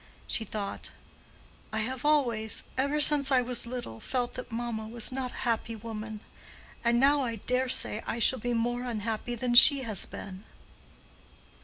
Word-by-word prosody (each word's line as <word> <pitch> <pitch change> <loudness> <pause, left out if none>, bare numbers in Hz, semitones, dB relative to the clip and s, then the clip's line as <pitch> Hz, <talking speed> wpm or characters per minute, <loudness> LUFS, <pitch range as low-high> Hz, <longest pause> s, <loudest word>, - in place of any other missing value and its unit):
She 225 - 0
thought, 200 -1 -5 0.8
"I 220 0 -2
have 255 +3 -5
always, 240 -8 +2
ever 280 +3 -1
since 290 -2 +6
I 255 -2 +3
was 245 -1 +2
little, 240 - -7
felt 245 -2 -3
that 255 - -9
mamma 225 -1 -5
was 230 +1 -1
not 255 -1 -4
a - - -13
happy 230 -1 -2
woman; 220 -1 -8 0.6
and 235 0 +2
now 280 +2 +3
I 235 -3 -3
dare 250 +4 -1
say 215 -2 +2
I - - -3
shall 245 +2 +2
be 245 +2 -3
more 240 +1 -2
unhappy 230 0 -4
than 240 +1 -2
she 270 +2 +7
has 215 -6 +4
been." 190 0 -10
240 Hz, 165 wpm, -28 LUFS, 220-255 Hz, 0.8 s, she